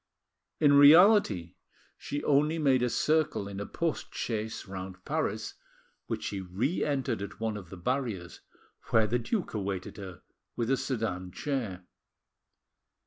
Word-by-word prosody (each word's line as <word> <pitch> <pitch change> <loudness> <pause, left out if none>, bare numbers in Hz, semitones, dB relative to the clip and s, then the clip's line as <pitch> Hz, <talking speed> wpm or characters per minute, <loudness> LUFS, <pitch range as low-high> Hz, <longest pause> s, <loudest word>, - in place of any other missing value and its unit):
In 145 -1 +5
reality 145 - +6 0.4
she 145 +1 -5
only 150 +3 +3
made 135 -5 +3
a 125 - +2
circle 155 -6 +1
in 100 -1 -6
a 100 - -5
post 165 -2 -3
chaise 110 -2 -3
round 95 -1 -8
Paris, - - -2 0.5
which - - -3
she 100 -1 -3
re 105 - -1
entered 135 -6 -1
at 100 +1 -7
one 110 -1 -2
of 95 -5 -8
the 95 - -9
barriers, 110 -4 -3 0.5
where 110 -1 +4
the 120 +3 0
duke 185 - -2
awaited 95 -3 -4
her 95 -4 -9 0.3
with 115 +1 -1
a 135 - +3
sedan 110 -9 -3
chair. 110 -9 -3
115 Hz, 140 wpm, -29 LUFS, 95-140 Hz, 0.5 s, reality